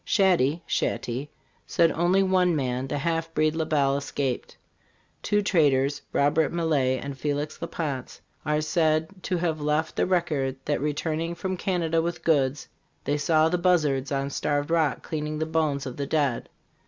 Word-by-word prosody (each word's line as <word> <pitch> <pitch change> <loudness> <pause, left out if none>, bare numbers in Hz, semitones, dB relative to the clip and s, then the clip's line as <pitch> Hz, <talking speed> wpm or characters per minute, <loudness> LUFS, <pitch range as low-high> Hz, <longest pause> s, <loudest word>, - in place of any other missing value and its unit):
Shad 190 -4 +3
dy 145 +7 0
(Shaty) 130 +5 -2 0.4
said 165 -1 +3
only 180 +4 +2
one 185 -2 +3
man, 130 -2 -1
the 145 - -2
half 165 +2 -1
breed 155 0 +2
La 160 -1 0
Bell, 140 -3 +2
escaped. 140 -2 -3 0.6
Two 205 0 +1
traders, 145 -7 +2
Robert 145 +2 +2
Maillet 145 -7 +1
and 140 -1 -5
Felix 145 +2 -3
La 170 - -3
Pance, 140 -8 -4 0.2
are 150 0 0
said 155 0 +1
to 180 - -1
have 165 -3 -1
left 150 +2 0
the - - +1
record 155 -8 0
that, 145 -1 0
re 150 0 -1
turning 165 +2 -2
from 185 +1 -3
Canada 170 -3 0
with 170 0 -4
goods, 140 -3 +1 0.4
they 145 - 0
saw 155 +1 +3
the 180 +2 0
buzzards 150 -7 +2
on 140 0 -1
Starved 145 +2 -1
Rock 160 -4 +1
cleaning 155 -1 -3
the 160 - -1
bones 155 -3 0
of 130 - -6
the 140 -1 -3
dead. 145 -6 0
155 Hz, 170 wpm, -26 LUFS, 140-165 Hz, 0.6 s, Shad